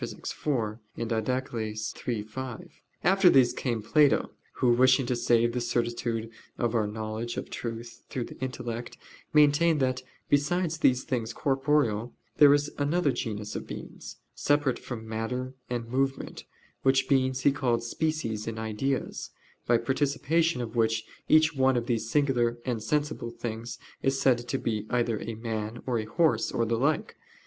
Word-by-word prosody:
iv, 115 -7 -3 0.2
Did. 115 0 -2 0.2
iii, 110 -3 -3
5). 125 +3 -7 0.3
After 190 0 +6
these 130 -6 +5
came 115 -4 -2
Plato, 145 +2 +3 0.2
who, 125 - +2
wishing 130 +2 +5
to 125 - 0
save 120 -1 +2
the 125 - -1
certitude 120 -1 -1 0.3
of 120 -1 0
our 110 -3 +2
knowledge 110 +2 -4
of - - -5
truth 115 0 -6
through 125 - -2
the - - -10
intellect, 120 -2 -5 0.3
maintained 150 +2 +4
that, 130 -1 0 0.3
besides 160 +3 +1
these 125 -3 +3
things 115 -3 -2
corporeal, 135 -5 +1 0.2
there 145 -1 +8
is 145 +1 +2
another 145 +1 +2
genus 105 -3 -4
of - - -5
beings, - - -8 0.2
separate 145 -3 +1
from 110 -3 -7
matter 125 +4 -3 0.2
and 120 -2 -3
movement, 135 +2 -2 0.4
which 135 0 +3
beings 130 -1 +2
he 140 - +5
called 125 -4 0
species 120 -5 -2
or 115 -1 -4
"ideas," 110 +5 -2 0.4
by 120 - +5
participation 145 +5 +1
of 120 0 -6
which 115 -1 +1 0.2
each 155 0 +5
one 130 -1 +3
of 120 - -1
these 115 -2 -1
singular 120 -4 +2
and 120 -4 -1
sensible 150 -2 -1
things 115 0 -5 0.2
is 135 0 +1
said 130 -3 +4
to 135 - -1
be 110 -4 -2
either 120 -3 +1
a 115 - -5
man, 110 0 -4
or 120 -3 0
a 110 - -3
horse, 160 +9 +2
or 115 - +1
the 115 +1 0
like. 145 +6 0
120 Hz, 155 wpm, -28 LUFS, 115-135 Hz, 0.4 s, there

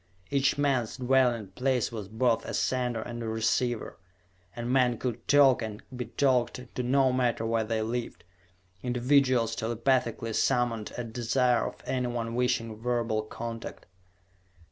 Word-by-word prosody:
Each 140 0 +2
man's 135 -6 0
dwelling 125 -5 +2
place 125 +4 0
was 110 -4 -6
both 115 +2 +1
a - - -4
"sender" 125 -3 0
and 120 0 -6
a 115 - -4
"receiver," 110 -2 -1 0.6
and 120 0 -3
men 125 -3 +3
could 120 -2 -4
talk 140 -4 +5
and 110 0 -6
be 125 -1 -4
talked 125 -2 0
to - - -2
no 130 +1 +3
matter 120 -3 +1
where 115 0 +1
they 110 0 -1
lived 120 +2 -4 0.6
individuals 125 -2 +2
telepathically 115 0 0
summoned 115 -2 +1
at 115 -2 -5
desire 120 0 +2
of - - -10
anyone 120 -3 -2
wishing 120 -3 0
verbal 120 -2 0
contact. 115 +1 -7
120 Hz, 140 wpm, -28 LUFS, 115-125 Hz, 0.6 s, talk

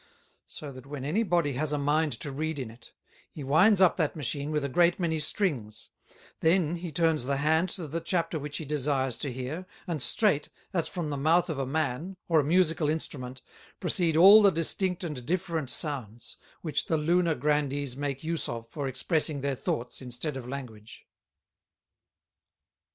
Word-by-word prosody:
So 145 -2 -7
that 130 0 -12
when 140 -2 -6
any 170 +10 +1
Body 170 -8 +1
has 150 +4 -1
a 150 - 0
mind 150 +2 +1
to 145 - -4
read 155 +3 -3
in 125 -5 -5
it, 115 +1 -16 0.4
he 150 - -8
winds 180 +9 +4
up 185 - +5
that 155 -5 0
Machine 145 0 -2
with 150 -2 -1
a - - 0
great 170 +6 +3
many 165 -3 0
Strings; 145 - -1 0.5
then 170 0 +2
he 170 -1 -6
turns 160 -4 +1
the 140 +1 0
Hand 160 +5 +2
to 175 -3 -4
the 165 +4 -3
Chapter 170 -2 -1
which 145 0 -5
he 160 - -6
desires 135 -3 0
to 140 - -3
hear, 130 +9 -5 0.2
and 165 -6 -3
straight, 175 - +3 0.2
as 170 -3 0
from 165 -4 -4
the 145 - -2
Mouth 165 +5 +2
of 145 - -4
a 135 - -2
Man, 155 +5 -2
or 165 -2 +4
a - - +2
Musical 165 -1 +2
Instrument, 130 -5 -4 0.4
proceed 165 -3 +2
all 200 +5 +9
the 200 - +7
distinct 180 +2 0
and 150 -7 -5
different 165 -2 -2
Sounds, 120 -6 -3 0.3
which 155 -4 -1
the 160 - +1
Lunar 170 +1 +2
Grandees 145 -3 -1
make 140 0 -4
use 165 0 -2
of 115 -1 -5
for 140 +3 -4
expressing 145 +2 0
their 140 0 -1
Thoughts, 120 -1 -3
instead 130 +4 -2
of 130 -2 -7
Language. 120 -5 -9
150 Hz, 180 wpm, -28 LUFS, 135-165 Hz, 0.5 s, all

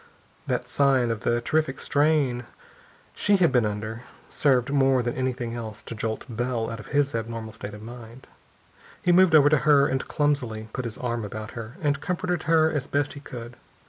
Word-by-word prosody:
That - - -1
sign 135 -4 +3
of 115 - -2
the 120 +3 0
terrific 155 +1 0
strain 145 -5 +1 0.7
she 205 - +2
had 175 -3 +4
been 120 -4 +3
under 110 +2 -5 0.3
served 135 -2 +2
more 135 -2 +3
than 120 0 -1
anything 125 -2 -2
else 110 -3 -7
to - - -7
jolt 110 0 -3
Bell 120 -1 -2
out 115 - -6
of 105 - -10
his 145 -1 +1
abnormal 115 -1 -4
state 105 -2 -7
of 105 - -11
mind. 120 +2 -11 0.8
He 180 - +3
moved 180 -2 +6
over 145 -2 +7
to 155 - +4
her 145 -2 +5
and 135 -1 -2
clumsily 125 -8 -1
put 130 - -3
his 115 -2 -5
arm 120 -2 -2
about 110 +1 -6
her, 115 +4 -8
and 145 -1 +1
comforted 180 -2 -2
her 160 -1 +4
as 145 -3 -2
best 145 0 0
he 145 - -9
could. 120 -4 -9
125 Hz, 190 wpm, -25 LUFS, 115-145 Hz, 0.8 s, over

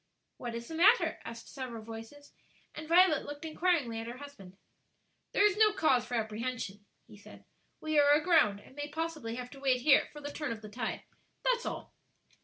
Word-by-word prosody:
"What 240 -2 -5
is 235 0 -6
the - - -8
matter?" 380 +9 +4
asked 230 0 -8
several 245 -5 -6
voices, 225 +6 -10 0.4
and 310 0 -8
Violet 335 -2 +5
looked 290 +2 -8
inquiringly 310 -8 0
at 225 - -6
her 240 +1 -7
husband. 200 -10 -12 0.7
"There 410 - +4
is 410 -3 +4
no 430 -1 +5
cause 265 - +2
for 245 - -3
apprehension," 220 -2 -3 0.2
he - - -15
said; 205 - -15 0.3
"we 310 -1 +1
are 285 0 +5
aground, 295 - +4
and 260 - -18
may 290 0 -4
possibly 305 -6 -4
have 250 0 -7
to 275 - -11
wait 260 -2 +2
here 280 +1 +5
for 295 - -10
the 290 0 -6
turn 295 -2 -4
of 220 -1 -6
the 215 - -8
tide; 225 +1 -4 0.4
that's - - +1
all." - - -6
275 Hz, 195 wpm, -31 LUFS, 230-315 Hz, 0.7 s, Violet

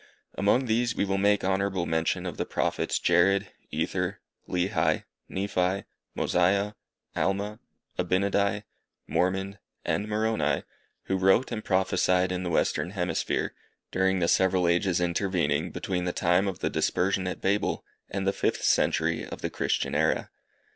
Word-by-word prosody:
Among 110 +6 +2
these 120 0 +1
we - - +1
will 95 0 0
make 100 +1 +3
honourable 95 -1 0
mention 80 +3 0
of 90 -4 -5
the - - -1
Prophets - - 0
Jared, 95 +3 +3 0.2
Ether, - - -2 0.3
Lehi, 90 -1 +1 0.3
Nephi, 95 -1 0 0.3
Mosiah, 100 +4 +2 0.4
Alma, 100 +2 -1 0.4
Abinadi, 100 +2 +1 0.4
Mormon, 95 +2 -1 0.3
and 105 - 0
Moroni, 110 +1 0 0.4
who 95 - -1
wrote 95 +8 +3
and 110 -2 -3
prophesied 95 -1 +2
in 90 0 -2
the 90 - -2
western 85 - +1
hemisphere, 90 -2 -1 0.4
during 95 +1 +2
the 85 -2 +1
several 95 0 +3
ages 90 +1 +2
intervening 85 -4 0
between 90 -2 -3
the 90 - -1
time 90 +3 +2
of 95 - -4
the - - 0
dispersion 95 0 +1
at 90 - -4
Babel, 100 +2 0 0.2
and 95 -1 -3
the 100 - +2
fifth - - -1
century 80 +2 +2
of - - -8
the - - -1
Christian - - -1
era. - - +1
95 Hz, 140 wpm, -27 LUFS, 90-100 Hz, 0.4 s, make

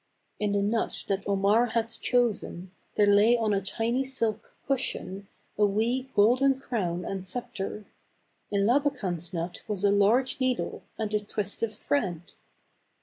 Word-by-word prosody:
In 210 -1 0
the 200 0 +2
nut 225 +3 -1
that 195 0 +1
Omar 200 +4 +3
had 230 0 -1
chosen, 225 -6 -1 0.2
there 210 - +5
lay 205 +4 +5
on 220 -2 +1
a 195 - +1
tiny 230 +6 -1
silk 230 -5 -2
cushion, 200 -7 -2 0.3
a 210 - +6
wee 235 +6 0
golden 255 +6 +4
crown 180 -10 -2
and 195 -1 -4
scepter; 210 -1 -5 0.7
m 200 -1 +2
Labakan's 200 - +1
nut 175 0 -4
was 205 -3 -3
a 200 - +5
large 220 +7 +3
needle 255 -1 -1 0.2
and 215 -1 -3
a 210 - +3
twist 205 -1 -4
of 225 -2 -1
thread. 190 - -1
210 Hz, 145 wpm, -28 LUFS, 200-240 Hz, 0.7 s, a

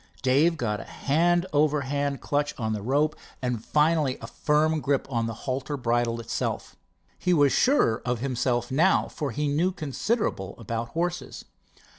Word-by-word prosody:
Dave 145 +6 +3
got 105 -6 -1
a - - -6
hand 175 +5 +1
over 150 0 +3
hand 140 +1 -2
clutch 145 0 -1
on 110 -2 -1
the 105 - -3
rope 145 +7 +1 0.2
and 125 -3 -2
finally 150 -2 +2
a - - -8
firm 150 +5 +1
grip 140 0 +1
on 115 -2 0
the 115 - -3
halter 135 +2 -2
bridle 120 -1 0
itself. 115 - -3 0.4
He 180 -1 +2
was 145 -3 +4
surer 255 - +3
of 125 0 -1
himself 125 -1 -1
now, 165 +8 +3
for 145 -3 -4
he 145 +5 -2
knew 160 +6 +1
considerable 155 - -2
about 115 +1 -4
horses. 175 +1 -3
140 Hz, 160 wpm, -26 LUFS, 120-155 Hz, 0.4 s, was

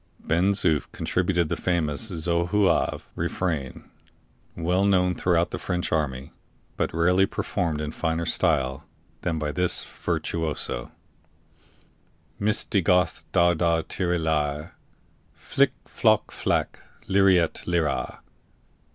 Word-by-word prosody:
Ben 90 +5 +1
Zoof 80 -7 +1
contributed 90 -2 0
the - - -1
famous 85 0 -1
Zouave 85 +3 +1
refrain, 80 -8 -3 0.7
well 90 +3 +1
known 90 -2 +3
throughout 85 -1 +1
the - - -4
French 90 -1 -2
army, 70 -4 -2 0.4
but - - -1
rarely 90 +4 +3
performed 80 -4 -2
in 75 0 -3
finer 80 +1 -2
style 65 -3 +1 0.4
than 85 -2 -1
by 75 -1 -2
this 90 +3 +3
virtuoso: 75 -7 -3 1.5
_"Misti 105 -2 +1
goth 90 0 +2
dar 85 0 +4
dar 85 -1 +1
tire 90 0 -1
lyre! 75 -1 -1 0.6
Flic! - - +1
floc! - - +2
flac! - - -1 0.3
lirette, 95 -3 +3
lira! 80 -5 -1
85 Hz, 110 wpm, -25 LUFS, 80-90 Hz, 1.5 s, dar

